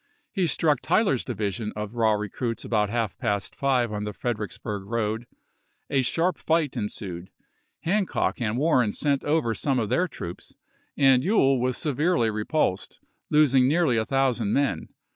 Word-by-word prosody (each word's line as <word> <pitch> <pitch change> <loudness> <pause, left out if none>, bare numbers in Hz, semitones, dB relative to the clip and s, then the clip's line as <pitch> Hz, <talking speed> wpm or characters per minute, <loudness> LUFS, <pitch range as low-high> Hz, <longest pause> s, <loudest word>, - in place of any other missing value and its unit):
He 190 -4 0
struck 150 -4 +1
Tyler's 175 - +2
division 105 +1 -3
of 105 0 -5
raw 115 -2 +3
recruits 105 +3 -3
about 105 -3 +1
half 115 -3 -1
past 105 -4 -2
five 125 -5 +1
on 105 0 -3
the 105 0 -4
Fred 120 0 -2
ericksburg 105 0 -5
road; 115 0 -2 0.6
a 135 - +3
sharp 165 +7 0
fight 160 -4 +1
ensued; 95 -4 -5 0.5
Hancock 190 -6 0
and 115 0 -1
Warren 130 -7 +2
sent 140 -2 0
over 145 -6 +1
some 135 +4 0
of 110 -4 -1
their 180 - +2
troops, 85 - -9 0.4
and 135 -3 +5
Ewell 135 - +3
was 125 0 0
severely 150 -5 +1
repulsed, 105 -2 -1 0.3
losing 135 -4 +4
nearly 155 -3 +2
a 110 - +2
thou 135 0 +2
sand 110 -4 -2
men. 135 - 0
125 Hz, 160 wpm, -25 LUFS, 105-145 Hz, 0.6 s, and